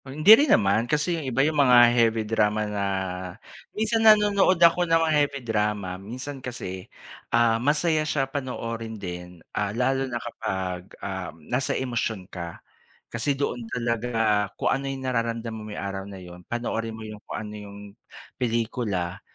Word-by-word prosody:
Hindi 155 +10 +7
rin 285 +5 +6
naman 105 +4 +3
kasi 150 +3 +1
yung 155 -5 -3
iba 135 +3 +2
yung 155 -1 +2
mga 120 -3 +7
heavy 115 -2 +2
drama 105 -1 +1
na 105 -1 -2 0.9
minsan 220 +1 0
nanonood 205 -4 +5
ako 170 +1 +4
ng 165 - +5
mga 165 -1 +2
heavy 145 -2 +1
drama 105 -4 -1
minsan 130 +6 -7
kasi, 95 -7 -6 0.4
ah, 115 -1 +3
masaya 155 +3 +2
siya 150 -3 0
panoorin 115 -5 -5
din, 90 -3 -8
ah, 105 -1 -1
lalo 130 +4 0
na 120 - -2
kapag, 95 -5 -4 0.2
ah, 95 -2 -4
nasa 125 - -2
emosyon 115 -6 -2
ka. 85 -2 -6 0.6
Kasi 135 +4 0
doon 135 -3 -2
talaga 115 -4 0
kung - - +1
ano 135 +1 -2
yung 135 -1 -5
nararamdam 115 -2 -2
mo 110 - -7
may 105 - -7
araw 100 0 -5
na 100 - -9
'yon, 90 -1 -11
panoorin 115 -1 -3
mo 110 - -8
yung 105 -1 -9
kung - - -7
ano 105 -1 -6
yung 100 -1 -9 0.6
pelikula 110 -6 -1
115 Hz, 160 wpm, -25 LUFS, 105-135 Hz, 0.9 s, Hindi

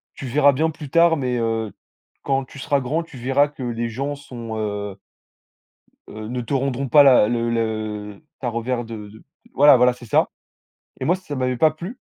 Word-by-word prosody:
«Tu 135 - -8
verras 145 +3 +4
bien 160 +5 +1
plus 150 -3 -8
tard, 170 +1 +4
mais 125 -3 -1
heu, 115 -2 -1 0.5
quand 135 -1 0
tu 140 - -13
seras 140 +1 +1
grand, 150 +7 -1
tu 160 -5 -13
verras 135 +4 +2
que 140 -3 -9
les 120 -1 -2
gens 140 +5 -3
sont, 120 -5 -8
heu 105 -2 -4 1.1
heu, 110 0 -8
ne 125 +1 -3
te 140 - -2
rendront 135 0 -1
pas 145 +1 +7
la 130 -6 +6
le 120 0 0
le 110 -2 -3 0.2
ta 125 - -2
revers 120 +1 -2
de 110 -2 -8
de» 110 +2 -16 0.3
voilà 145 -1 +7
voilà, 125 0 +4
c'est 125 0 -13
ça, 105 - +2 0.7
et - - -2
moi, 180 - +2
ça 180 -6 -8
m'avait 130 -1 -1
pas 155 +5 +4
plu. 175 +10 -8
125 Hz, 200 wpm, -22 LUFS, 115-145 Hz, 1.1 s, pas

